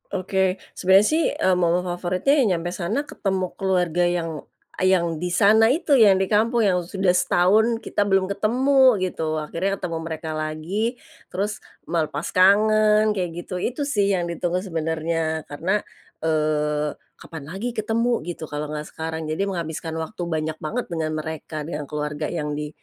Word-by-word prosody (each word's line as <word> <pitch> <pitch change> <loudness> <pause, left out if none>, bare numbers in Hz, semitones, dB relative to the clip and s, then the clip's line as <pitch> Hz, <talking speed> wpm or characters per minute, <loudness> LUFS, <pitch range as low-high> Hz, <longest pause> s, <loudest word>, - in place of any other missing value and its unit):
Oke, 190 0 0 0.2
sebenarnya 190 +2 +4
sih, 320 +1 +2
eee, 185 -1 +2
momen 175 +1 +2
favoritnya 180 +7 0
yang 255 - +4
nyampai 175 +1 -4
sana 195 +10 -2
ketemu 190 -9 -2
keluarga 180 -3 +1
yang 175 -1 -1 0.5
a - - 0
yang 170 -3 +2
di 180 - -2
sana 215 +4 +5
itu 305 -3 +2
yang 195 -4 +6
di 190 - -1
kampung 230 +3 +2
yang 190 -4 +3
sudah 190 +1 -1
setahun 210 +6 +3
kita 205 - -1
belum 195 -1 +2
ketemu 255 +6 +4
gitu 160 -4 -2
akhirnya 170 +6 -2
ketemu 180 -4 -4
mereka 160 -1 -4
lagi 175 +10 -3 0.3
terus 205 +3 -2 0.3
melepas 155 -2 -1
kangen 215 +3 +4
kayak 190 -4 -1
gitu 180 - -6
itu, 210 +7 -2
itu 275 - -5
sih 205 -7 +2
yang 175 -2 -1
ditunggu 175 +2 -1
sebenarnya 160 -2 -2
karena, 185 +8 -1 0.4
eee, 150 -1 0 0.2
kapan 160 -3 -9
lagi 210 +8 -4
ketemu 230 +2 0
gitu 165 0 -6
kalau 150 0 -5
nggak 150 0 -4
sekarang 160 0 -5
jadi 160 +6 -1
menghabiskan 160 -2 -4
waktu 160 +4 -5
banyak 155 -1 -2
banget 230 +11 -3
dengan 160 -2 -2
mereka, 155 -1 -6
dengan 150 -2 -4
keluarga 150 0 -3
yang 150 -3 -3
di, 150 0 -4
180 Hz, 165 wpm, -23 LUFS, 160-205 Hz, 0.5 s, yang